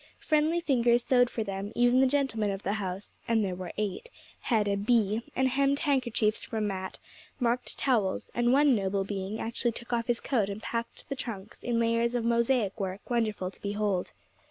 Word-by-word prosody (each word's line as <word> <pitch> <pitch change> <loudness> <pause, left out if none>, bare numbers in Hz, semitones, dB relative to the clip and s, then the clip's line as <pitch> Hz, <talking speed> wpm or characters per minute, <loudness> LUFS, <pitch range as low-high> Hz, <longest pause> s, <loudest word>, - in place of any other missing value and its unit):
Friendly 310 +2 +2
fingers 240 -6 +3
sewed 245 -1 +4
for 225 - -2
them; 200 0 -4
even 245 +1 +4
the 265 - +5
gentlemen 255 -6 0
of 195 0 -4
the 200 - 0
house 195 -2 -5
and 225 -2 +2
there 185 - -2
were 180 -1 -6
eight 215 - -3 0.3
had 220 -4 +1
a 200 - +1
'bee,' 215 +1 +2
and 265 0 +3
hemmed 275 +2 +2
handkerchiefs 240 -7 +1
for 225 - -4
Mat, 190 -3 -3 0.4
marked 245 0 0
towels; 225 -8 0
and 240 0 +2
one 285 +1 +5
noble 195 -1 0
being 195 +1 -4
actually 235 +1 -1
took 235 +2 -7
off 230 -1 0
his 240 -1 +1
coat 225 -8 0
and 200 +2 -6
packed 230 0 -4
the 275 - -3
trunks 220 -5 -7
in 235 -1 0
layers 230 +1 +1
of 235 -2 0
mosaic 235 -3 +1
work 195 +3 -5
wonderful 215 -6 0
to - - -16
behold. 205 -2 -1
230 Hz, 190 wpm, -29 LUFS, 200-245 Hz, 0.4 s, the